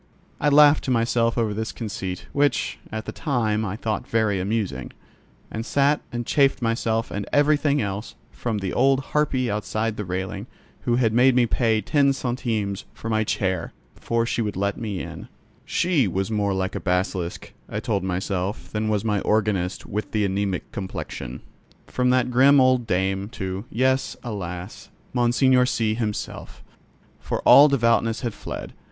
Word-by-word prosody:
I 150 - +3
laughed 145 +1 +6
to - - -2
myself 115 -1 +1
over 110 -3 +1
this 110 +1 -3
conceit, 95 -5 -5
which, 145 -2 +1
at 110 0 -4
the - - -4
time, 110 -8 0
I 100 -2 -3
thought 110 -1 -3
very 110 -4 +1
amusing, 100 +1 -2 0.6
and 110 - -4
sat 140 +4 +2
and 120 0 -3
chaffed 135 -1 +3
myself 115 -1 -1
and 100 0 -4
everything 145 -1 +3
else, 100 +2 -5 0.2
from 115 -3 -3
the 95 -2 -3
old 135 +1 +3
harpy 135 -5 +1
outside 110 +1 -2
the 105 - -3
railing, 95 +1 -4 0.4
who 120 - +2
had 115 -3 +2
made 125 +2 +5
me 125 -1 +5
pay 115 -2 +1
ten 140 +5 +3
centimes 115 -6 -2
for 115 - -5
my 110 0 +2
chair, 95 -5 -1 0.2
before 115 0 -1
she 120 - -1
would 105 -2 -2
let 100 +2 0
me 105 -5 -4
in - - -8 0.4
(she 170 - +2
was 95 +4 -2
more 100 -2 0
like 95 0 -2
a - - -3
basilisk, 90 -1 -2 0.2
I 105 - -3
told 110 -4 -1
myself, 95 +2 -3
than 110 0 -1
was 105 0 0
my 105 -2 +1
organist 100 -4 0
with 105 +2 -4
the 105 -2 +2
anaemic 95 -1 -2
complexion): 95 -9 -6 0.4
from 125 0 0
that 125 0 +2
grim 135 +3 +6
old 130 -2 +3
dame, 95 +2 0
to, 95 0 -4
yes, 130 +2 +1
alas! 95 -4 -6 0.2
Monseigneur 125 +1 +3
C—— 110 -3 0
himself. 110 -2 -5 0.6
For - - -3
all 145 +2 +8
devoutness 115 -4 +2
had 120 -4 -2
fled. - - -7
110 Hz, 165 wpm, -24 LUFS, 100-125 Hz, 0.6 s, all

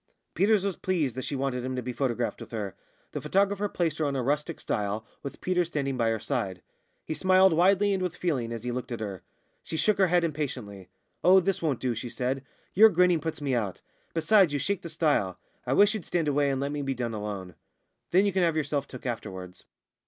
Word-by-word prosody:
Peters 200 +2 +3
was 195 -3 -1
pleased 160 -10 0
that 130 - -4
she 145 - -3
wanted 130 -2 -1
him 130 0 -3
to 125 - -2
be 125 +1 -4
photographed 120 -2 -1
with - - -8
her. 105 -4 -4 0.4
The 145 - -4
photographer 200 +6 +1
placed 165 -4 -1
her 155 - +1
on 140 -1 -1
a 130 - -1
rustic 150 +5 -1
stile, 105 0 -2 0.2
with 140 - -7
Peters 180 -2 +1
standing 140 -5 -2
by 115 -2 +1
her 110 -1 0
side. 100 -9 -3 0.4
He - - -3
smiled 185 +3 +5
widely 195 +4 +4
and 190 - -1
with 180 -1 -2
feeling, 130 -10 -1
as 115 -1 -5
he 125 - -2
looked 125 +1 -5
at 120 - -3
her. 100 -4 -5 0.4
She 160 - -5
shook 200 +7 +2
her 190 - +5
head 175 0 +3
impatiently. 130 - -4 0.3
"Oh, 190 +1 +7
this 195 +1 0
won't 150 -7 0
do!" 125 -2 0
she 120 +2 -5
said, 130 +3 -2 0.3
"your 220 +4 +8
grinning 180 -2 +3
puts 160 0 -4
me 140 -2 -1
out. 105 -6 -2 0.3
Besides, 180 +1 +4
you - - +1
shake 195 +7 -1
the 170 - -7
stile. 150 - +1 0.3
I - - +2
wish 205 +1 +5
you'd 215 -5 -4
stand 170 -3 0
away 145 0 +2
and 135 -1 0
let 140 +1 -2
me 145 0 -3
be 135 -1 -2
done 120 -2 -3
alone. 100 -4 -5 0.6
Then 190 +3 +4
you 200 - +1
can 190 - +2
have 165 -2 +2
yourself 145 -2 -1
took 130 - -10
afterwards." 95 -7 -6
145 Hz, 225 wpm, -28 LUFS, 120-180 Hz, 0.6 s, your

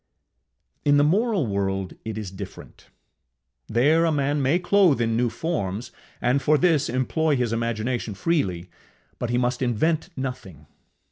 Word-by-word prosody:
In 145 0 +4
the 145 - +5
moral 200 - +2
world 95 -2 -2
it 110 -1 -5
is 105 -4 -5
different: 95 - -10 0.8
there 145 +8 +3
a 165 - +2
man 145 0 0
may 135 +6 +3
clothe 180 -5 +3
in 115 -1 +1
new 120 +1 +1
forms, 115 - -3 0.3
and 130 +3 +1
for 150 +2 +3
this 165 -4 +2
employ 140 +5 +1
his 125 -3 0
imagination 115 -1 -2
freely, 95 - -1 0.5
but 120 - -2
he 120 - +1
must 125 +1 0
invent 155 - 0
nothing. 115 - -6
125 Hz, 145 wpm, -24 LUFS, 110-155 Hz, 0.8 s, the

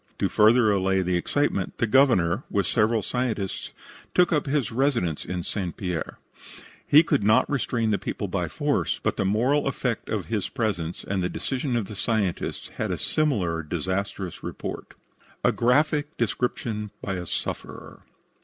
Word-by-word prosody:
To - - +1
further 110 +1 +5
allay 95 -1 +2
the 90 0 0
excitement, 95 0 0
the - - +2
Governor, 115 -7 +4
with 100 -2 +1
several 110 +2 +2
scientists, 110 -5 -2 0.4
took 180 -1 +4
up 150 -1 +1
his 135 -5 0
residence 120 - 0
in 90 0 -4
St. 90 -3 -3
Pierre. 90 -4 -3 0.7
He 150 +3 +7
could 150 -8 +1
not 110 +1 +4
restrain 120 -5 0
the 100 - +1
people - - -3
by - - -1
force, - - 0
but - - +1
the 100 - -1
moral 125 +9 +2
effect 125 -3 -2
of 105 -4 -2
his 110 -4 -2
presence 90 -7 -2
and 100 -1 0
the 90 - 0
decision 130 -1 -2
of 115 -4 0
the 105 - -8
scientists 100 -4 -1
had - - -1
a - - -1
similar 100 - 0
disastrous 95 +3 -3
result. - - -6 0.5
A - - +5
GRAPHIC 145 +4 +2
DESCRIPTION 115 -2 -1
BY 95 - -2
A 90 -1 -4
SUFFERER. - - -5
110 Hz, 160 wpm, -25 LUFS, 95-125 Hz, 0.7 s, He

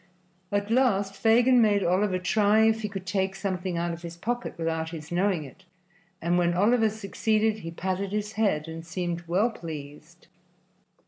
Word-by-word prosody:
At 205 +1 -1
last 205 -6 +2
Fagin 240 +4 +4
made 205 -3 +3
Oliver 185 +2 +2
try 210 +4 +3
if 220 0 +3
he 210 - -3
could 195 -2 -6
take 190 0 -1
something 185 -2 -3
out 170 0 -1
of 170 - -8
his 170 0 -8
pocket 240 +6 -3
without 160 -1 -2
his 160 -1 -9
knowing 180 -2 +1
it, 135 - -13 0.6
and 175 +1 +1
when 175 0 +2
Oliver 220 +4 +3
succeeded 215 +1 0
he 165 - -6
patted 190 +3 -3
his 210 0 -2
head 200 -8 0
and 165 0 -7
seemed 175 0 -3
well 200 +8 +2
pleased. 150 -7 -9
195 Hz, 170 wpm, -27 LUFS, 170-215 Hz, 0.6 s, Fagin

